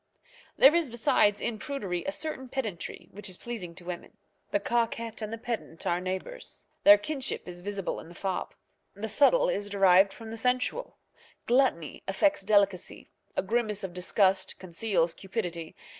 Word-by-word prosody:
There 275 - +8
is 335 -5 +2
besides, 230 -3 +3
in 220 -2 -2
prudery, 205 - -3
a - - +1
certain 300 -4 -4
pedantry 225 -10 -4
which 205 0 -5
is 185 - -5
pleasing 200 -8 -6
to 175 - -10
women. 180 +4 -7 0.3
The 205 - +1
coquette 230 +1 -1
and 215 0 -4
the 230 - -4
pedant 225 -8 -5
are 175 +1 +1
neighbours. 190 - -5 0.2
Their 205 0 +10
kinship 265 +2 -4
is 175 0 -7
visible 200 0 -3
in - - -11
the 175 - -13
fop. 190 -1 -3 0.4
The 210 +3 -4
subtile - - +4
is 205 0 -1
derived 195 -1 +5
from 225 +2 -9
the 225 - -6
sensual. 255 - 0 0.5
Gluttony 240 - +2
affects 295 +9 +2
delicacy, 200 -2 +1 0.3
a - - +2
grimace 215 -1 0
of 190 -2 -4
disgust 190 +1 +1
conceals 175 -2 0
cupidity. 175 -5 -4
205 Hz, 160 wpm, -29 LUFS, 185-240 Hz, 0.5 s, Their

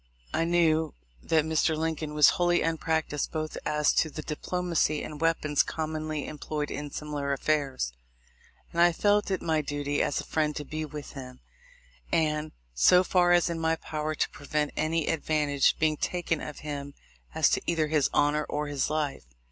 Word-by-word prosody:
I 165 - +1
knew 160 -2 +2 0.3
that 160 -2 +2
Mr. 160 0 +1
Lincoln 155 -1 -2
was 150 -1 +7
wholly 175 0 +2
unpractised 160 -2 -1
both 155 -1 -3
as 150 -1 +2
to 160 - +2
the 155 +1 -7
diplomacy 165 -1 -1
and 150 0 -7
weapons 155 -3 +2
commonly 155 -1 -3
employed 150 0 -4
in 145 0 -4
similar 145 -1 -3
affairs; 135 - -1 0.8
and 170 - +1
I 175 0 +6
felt 205 +4 +2
it 190 -2 -1
my 160 -2 +1
duty, 145 0 -2
as - - 0
a - - -4
friend, 150 -1 0
to 150 - -5
be 155 +2 -4
with 150 -1 -8
him, 130 -2 -9 0.7
and, 155 -1 +1 0.2
so 125 - +6
far 180 -1 +3
as 175 0 +4
in 170 -1 -3
my 160 0 +1
power, 155 -1 -4
to - - 0
prevent 150 +1 -2
any 160 0 0
advantage 150 -3 +1
being 155 -1 +1
taken 175 -2 -1
of 150 - -7
him 145 -1 -5 0.4
as - - +4
to - - +1
either 165 -2 +2
his 150 -2 +2
honor 150 +1 +2
or 150 +1 -1
his 140 -2 -1
life. 150 - -2
155 Hz, 170 wpm, -28 LUFS, 150-160 Hz, 0.8 s, was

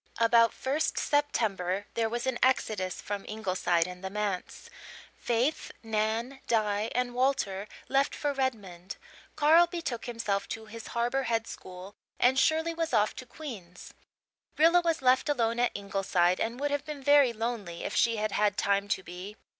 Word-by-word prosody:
About 230 0 +5
1st 285 +4 -1
September 205 -10 0
there 225 -1 0
was 240 +1 -3
an 260 -2 -1
exodus 215 -8 +1
from 205 -1 -4
Ingleside 185 -5 0
and 180 +1 -9
the 190 - -3
manse. 205 - -4 0.5
Faith, 245 +6 -1
Nan, 225 +4 -1
Di 215 -1 +1
and 250 0 0
Walter 245 -6 0 0.2
left 275 +1 +1
for 290 -1 -1
Redmond; 200 -9 -4 0.4
Carl 320 +3 +6
betook 330 -9 -4
himself 225 -5 -2
to 220 -1 -6
his 225 +1 -9
Harbour 245 +3 +1
Head 225 -1 +1
school 185 -1 -10 0.3
and 260 +2 +4
Shirley 320 +3 +2
was 330 -3 -3
off 210 0 +2
to 255 - -8
Queen's. 205 - -9 0.6
Rilla 335 +3 +6
was 330 -5 -1
left 255 +3 +3
alone 235 -4 +1
at 245 - +2
Ingleside 195 -3 +1
and 230 +3 -2
would 290 0 -1
have 285 -1 -1
been 300 -2 -7
very 285 -2 +6
lonely 225 -6 -4
if - - -4
she 230 -1 +3
had 215 0 -1
had 205 -1 +1
time 200 0 +1
to 190 -1 -1
be. 180 +4 -8
230 Hz, 160 wpm, -29 LUFS, 200-265 Hz, 0.6 s, Carl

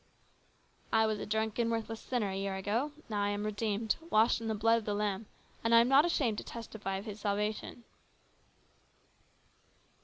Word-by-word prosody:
" - - -37
I 220 0 +4
was 215 -1 0
a - - -5
drunken, 220 +2 0
worthless 225 -1 -2
sinner 230 -6 -1
a - - -4
year 195 0 -2
ago; 220 +9 -1 0.2
now 210 -3 -1
I 205 - +1
am 205 +1 -2
redeemed, 215 0 -1
washed 225 -1 +4
in 225 - -4
the 220 - 0
blood 225 +2 +3
of 220 - -11
the 205 - -1
Lamb, 205 0 -1 0.4
and 230 +1 +4
I - - +9
am 235 +2 +4
not 275 +4 +6
ashamed 255 -11 +1
to - - -7
testify 220 -4 -5
of 195 - -7
His 215 -1 -7
salvation." 210 +3 -2
220 Hz, 185 wpm, -32 LUFS, 205-230 Hz, 0.4 s, I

